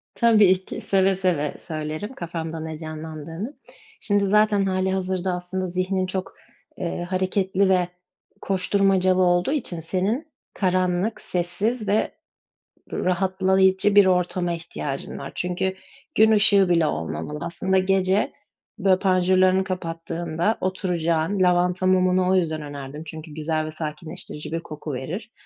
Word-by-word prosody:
Tabii 205 -5 +4
ki, - - -6
seve 195 0 +2
seve 175 -6 0
söylerim. 155 +7 -5
Kafamda 165 -5 -5
ne 160 0 -6
canlandığını. 160 - -7 0.5
Şimdi 205 -2 +2
zaten 210 0 +3
hâlihazırda 190 -1 -1
aslında 180 +1 -3
zihnin 185 +1 -1
çok, 185 0 -4 0.4
eee, 175 -1 -3
hareketli 190 +1 +1
ve 180 -2 +3 0.5
koşturmacalı 190 -1 +3
olduğu 175 +6 +2
için 235 - 0
senin 205 - -2 0.2
karanlık 185 +2 0
sessiz 205 +6 -1
ve 205 +2 +1 0.8
r - - -3
rahatlayıcı 190 +2 +2
bir 205 -1 +8
ortama 180 -1 +1
ihtiyacın 155 -4 -5
var. 135 - -7
Çünkü 185 +1 -1 0.4
gün 220 +1 +6
ışığı 205 -3 +6
bile 170 -2 +3
olmamalı. 80 - -4
Aslında 180 +3 0
gece, 190 +1 +2 0.5
böyle, 185 -1 +3
panjurlarını 185 0 +3
kapattığında 170 +1 -2
oturacağın, 180 -1 0
lavanta 180 0 +2
mumunu 185 0 +3
o 190 - +3
yüzden 160 -4 0
önerdim. 145 0 -7
Çünkü 155 0 -8
güzel 155 0 -2
ve 155 - -5
sakinleştirici 155 0 -6
bir 165 - -1
koku 155 -2 -7
verir, 160 - -5
185 Hz, 125 wpm, -23 LUFS, 165-190 Hz, 0.8 s, bir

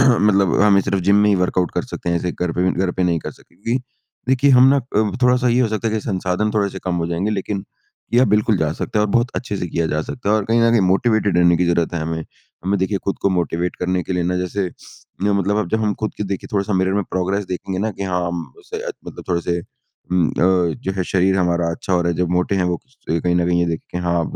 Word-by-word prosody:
मतलब 105 -8 +4
हमें 100 -1 +5
सिर्फ़ 100 0 -1
जिम 100 - +5
में 105 - +4
ही 105 - +4
वर्कआउट 90 -1 +1
कर - - 0
सकते - - -6
हैं, 85 - +2
ऐसे 90 +1 -1
घर 90 -2 -2
पे 90 - -1
भी 95 - +3
घर 95 - +1
पे - - +3
नहीं 85 -2 +1
कर - - -3
सकते, - - -20
क्योंकि 120 +5 -2 0.5
देखिए 135 +2 +4
हम 130 0 +7
ना 140 - +5
अ, 110 -5 0
थोड़ा 125 0 +5
सा 125 0 +1
ये 120 +1 +3
हो 120 - +2
सकता 110 +1 -1
है 110 - -2
कि 110 - 0
संसाधन 95 0 -1
थोड़े 100 -2 +2
से - - -7
कम 90 -1 -1
हो 85 - -1
जाएँगे, 85 +5 -1
लेकिन 100 -1 -2 0.5
किया 125 +2 +5
बिल्कुल 105 -1 +2
जा 80 -1 0
सकता 105 - -2
है 105 - +3
और 105 - -2
बहुत 120 +3 +2
अच्छे 105 -5 -3
से 90 - -3
किया 85 -1 -1
जा 75 0 -1
सकता 110 +5 -5
है, 105 - +4
और 105 - -1
कहीं 115 +2 +2
न 115 - +4
कहीं 115 -2 +4
मोटिवेटेड 110 -3 +2
रहने 85 -1 +5
की 90 - +1
ज़रूरत 85 0 +1
है 85 - -1
हमें। 80 0 -3 0.4
हमें 100 +2 +1
देखिए 95 +1 0
खुद 100 - -1
को - - +3
मोटिवेट 90 0 -1
करने 90 0 -1
के 95 - -4
लिए 90 - 0
ना, 90 +1 0
जैसे 90 +2 -1 0.6
मतलब 100 0 +1
अब 100 -5 -1
जब 110 +3 0
हम 105 -1 +1
खुद 110 - -2
की - - -3
देखिए 95 -1 -4
थोड़ा-सा 100 0 0
मिरर 95 0 +1
में 100 - +1
प्रोग्रेस 95 +2 -1
देखें 95 +1 -4
ना 110 +3 0
कि 100 - -7
हाँ 90 -2 -1
हम 85 -1 -3
उसे - - -8 0.3
मतलब - - -9
थोड़े 85 -1 +1
से 85 0 -1
उ - - -13 0.7
अ, 90 -1 +2
जो 95 - -1
है 95 - -1
शरीर 95 +1 +2
हमारा 85 -2 +1
अच्छा 85 +3 -4
हो 90 - +3
रहा 85 - +1
है, 85 - -3
जब 90 - +1
मोटे 90 +2 +1
हैं 90 - +1
वो 90 0 0 0.3
कहीं 85 +2 +1
न 85 -1 +2
कहीं 90 0 +2
ये 85 - +2
देखे 85 -1 -3
कि 90 - -3
हाँ 85 -1 +1
95 Hz, 275 wpm, -20 LUFS, 90-105 Hz, 0.7 s, हम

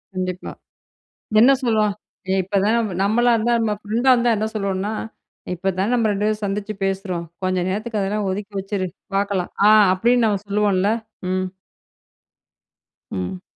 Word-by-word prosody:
கண்டிப்பா. 185 -1 -3 0.9
என்ன 250 +4 +7
சொல்லுவா? 220 -3 +2 0.4
"ஏ - - +3
இப்பதா 200 +2 +1
ம் 210 - -3
நம்மளா 235 +4 +3
இருந்தா, 235 +2 +1
நம்ம 215 -2 +1
ஃப்ரெண்டா 230 +5 +1
இருந்தா 240 -1 +2
என்ன 215 +1 -1
சொல்லுவோம்னா, 200 0 -2 0.6
இப்பதான் 190 +5 -1
நம்ம 230 -3 +2
ரெண்டு 205 +1 -1
பேரும் 215 0 -1
சந்திச்சு 205 +2 -2
பேசுறோம். 190 -3 -2 0.2
கொஞ்ச 185 0 0
நேரத்துக்கு 215 +3 -2
அதெல்லாம் 200 +1 -1
ஒதுக்கி 205 +2 -5
வச்சுரு. 195 -1 -3 0.3
பாக்கலாம்," 195 -2 -1 0.2
ஆ - - +7 0.2
அப்டின்னு 235 +4 +3
நம்ம 205 -3 +1
சொல்லுவோம்ல? 200 -1 +2 0.4
ம். 185 0 0 1.7
ம். 90 0 -4
205 Hz, 135 wpm, -21 LUFS, 190-215 Hz, 1.7 s, என்ன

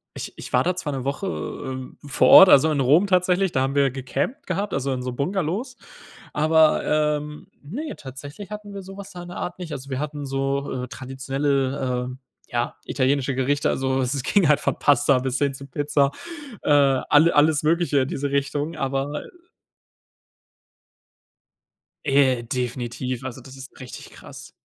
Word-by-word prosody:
ich - - -6
ich - - -9
war - - +4
da 180 +1 0
zwar 155 -5 -4
'ne 130 -2 -4
Woche, 145 +8 -2
ähm, 130 -7 -6
vor 140 - +2
Ort, 190 - +10
also 155 +1 +6
in 150 - 0
Rom 150 +10 +4
tatsächlich- 185 0 +2
da 130 - +1
haben 135 +1 -1
wir 140 -1 +3
gecampt 135 - -4
gehabt, 200 +1 -2
also 135 0 -1
in 125 -1 -4
so 125 -1 -4
Bungalows. 190 - -2 0.6
Aber, 155 +1 +4
ähm, 150 0 -1
ne, 265 - -6
tatsächlich 145 +9 -9
hatten 210 -1 -8
wir 200 - -6
so 195 +1 -11
was 200 0 -9
da 180 -2 -9
in 175 - -10
der 175 - -8
Art 180 - -5
nicht. 175 -3 -7
Also, 135 0 -7
wir 130 - -2
hatten 145 -1 -4
so, 135 -1 -2
äh, - - -13
traditionelle, 135 -1 -2
äh, - - -8 0.4
ja, 120 -1 -1
italienische 135 0 0
Gerichte. 140 +2 +1
Also, 130 0 0
es 130 +1 -1
ging 180 +2 +3
halt 150 - +4
von - - -1
Pasta 140 -1 +4
bis 130 0 -2
hin 140 -1 +1
zu 135 +1 -10
Pizza, 145 0 +1 0.5
äh, - - +1
alle 145 +3 +4
alles 150 0 +4
Mögliche 165 -2 +2
in 130 - -1
diese 140 0 -3
Richtung, 145 +3 -1
aber, 135 0 -2
äh - - -13 2.8
Äh, 135 -4 +3
definitiv. 125 +1 -3
Also, 130 0 -6
das 130 +2 -13
ist 135 0 -11
richtig 130 -2 -9
krass. - - -12
140 Hz, 175 wpm, -23 LUFS, 130-160 Hz, 2.8 s, Ort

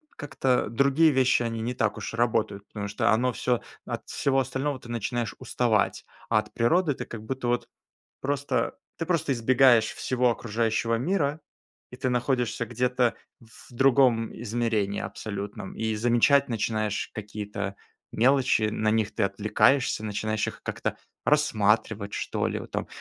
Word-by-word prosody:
как-то 130 -5 0
другие 140 +7 +4
вещи, 130 -2 +3
они 115 -1 -3
не 120 +2 -2
так 110 -4 0
уж - - -5
работают, 110 -4 0
потому 100 -1 -5
оно 120 +4 +3
всё, 120 +2 0 0.2
от - - -5
всего 135 -1 +1
остального 135 +1 -2
ты 120 - -13
начинаешь 120 0 -2
уставать. 110 -5 0 0.2
А - - +4
от - - -8
природы 155 +6 +2
ты - - -6
как 115 - -8
будто 130 0 -3
вот 120 - 0 0.5
просто, 140 +1 -1 0.2
ты 165 - -3
просто 160 -5 +1
избегаешь 120 -1 +5
всего 125 -1 +1
окружающего 115 0 0
мира, 150 +2 0 0.5
и 125 - -10
ты 130 0 -1
находишься 125 -2 0
где-то 125 +1 +1 0.3
в 115 -2 -15
другом 125 -3 +3
измерении 110 -3 -1
абсолютном. 100 -2 -6
И 110 -1 -1
замечать 120 +5 +3
начинаешь 110 -2 -1
какие-то 105 -2 -5 0.4
мелочи, 130 -1 +3
на 110 0 0
них 110 -1 0
ты - - -1
отвлекаешься, 105 +4 +2
начинаешь 110 0 -1
их - - -7
как-то - - -3 0.3
рассматривать, 110 -7 +2
что - - -2
ли, - - -3
вот - - -10
там: - - -3
120 Hz, 145 wpm, -26 LUFS, 110-130 Hz, 0.5 s, избегаешь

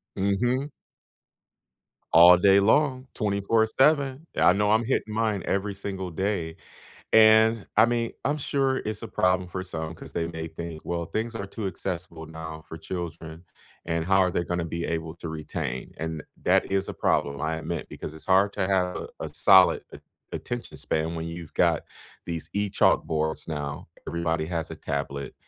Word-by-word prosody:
Mhm. 120 +8 0 1.5
All 85 +1 +9
day 100 +1 +5
long, 130 +4 +2
24/7. 125 +8 +2
I 90 - +6
know 105 +1 +1
I'm 110 +1 +3
hitting 110 -3 -1
mine 110 -3 0
every 100 +1 0
single 95 -2 -5
day. 85 -2 -2 0.6
And, 110 0 +6
I 110 - +8
mean, 120 -1 -1
I'm 145 +2 +1
sure 135 -2 0
it's 110 +1 -5
a - - -4
problem 90 -2 +1
for 95 +1 -4
some 80 -3 -5
'cause - - -12
they 85 -1 -1
may 80 -1 -5
think, 80 0 -8
"Well, 85 -1 -2
things 115 +3 -3
are 100 - -4
too 100 -1 -4
accessible 85 -4 -5
now 80 -1 -8
for 80 - -7
children," 80 0 -6 0.4
and 85 -1 -1
"how 95 0 +4
are 90 -2 +3
they 85 - 0
gonna 90 0 -2
be 85 +1 -4
able 80 -1 -3
to 85 - -7
retain?" 75 -4 -5
And 80 -1 -4 0.2
that - - +3
is 95 0 0
a - - -4
problem, 70 0 0
I 80 +1 -1
admit, 80 0 -4
because 75 - -7
it's 80 - -12
hard 100 +2 +4
to 95 - 0
have 90 -2 0
a - - -3
solid 95 -1 +6
at - - -10 0.3
attention 120 -1 -5
span 80 +2 -1
when 80 0 -4
you've 85 -1 -8
got - - +2 0.4
these 85 -2 -5
e-chalkboards 80 -6 +1
now. 75 -2 -4 0.2
Everybody 80 -2 -1
has 85 -2 -3
a - - -7
tablet, 70 -1 -4
90 Hz, 165 wpm, -26 LUFS, 80-105 Hz, 1.5 s, All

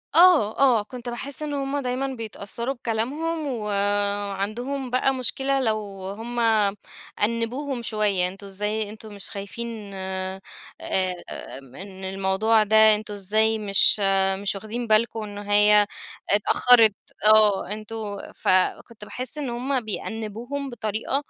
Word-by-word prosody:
آه، 330 - +6
آه، 250 -6 +4
كنت 245 +2 -8
باحس 270 +5 -4
إن 295 -1 -3
هُم 275 0 -2
دايمًا 255 +1 -2
بيتأثّروا 230 +2 -4
بكلامهم، 280 +7 -2
وعندهم 205 +3 -1
بقى 255 +2 +2
مشكلة 270 +1 -1
لو 220 -4 +1 0.4
هُم 240 +2 -5 0.8
أنّبوهم 240 +4 -1
شوية، 210 -5 +1
أنتم 195 +2 -9
إزاي 210 +2 -2
أنتم 215 0 -10
مش 200 - -8
خايفين 210 +1 -6
آآ، 190 0 -4 1.3
إن 190 0 -9
الموضوع 195 +4 +2
ده 220 0 +6
أنتم 210 0 -6
إزاي 215 +3 +1
مش 205 0 +4 0.4
مش 200 0 -1
واخدين 220 +4 -5
بالكم 220 0 +2
إن 205 -1 -8
هي 205 0 +4 0.4
اتأخرت؟ 220 +1 +5 0.3
آه، 215 -2 +5
أنتم 215 -1 -5 0.2
فكنت 210 +4 0
باحس 255 +6 -5
إن 285 -4 -3
هُم 255 +2 -1
بيأنّبوهم 225 +6 -4
بطريقة 220 0 -3
220 Hz, 120 wpm, -24 LUFS, 205-245 Hz, 1.3 s, آه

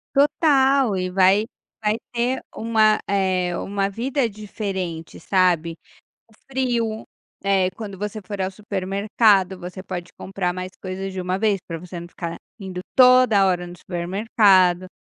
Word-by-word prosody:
Total 275 - +3
e 185 0 -2
vai 190 +3 +4 0.4
vai 210 +1 +1 0.2
ter 245 +2 0 0.2
uma, 220 -1 +3
eh, 185 -3 0
uma 195 0 -2
vida 245 +3 -1
diferente, 195 -5 -5
sabe, 170 -3 +1 0.5
o - - -23
frio, 240 -4 -1 0.4
eh, 190 -2 +2
quando 200 -3 -8
você 210 +2 -4
for 200 +1 -7
ao 190 0 -1
supermercado 195 0 +1
você 180 +1 -8
pode 180 -2 -6
comprar 185 -2 -2
mais 185 0 -5
coisas 190 +1 -5
de 185 - -4
uma 185 +1 -2
vez 210 -3 +2
pra 165 -1 -5
você 175 0 -8
não 170 - -9
ficar 170 -1 -6 0.2
indo 185 -2 -6
toda 250 -6 +6
hora 180 -1 0
no 175 0 -10
supermercado. 185 0 +2
195 Hz, 145 wpm, -22 LUFS, 185-220 Hz, 0.5 s, toda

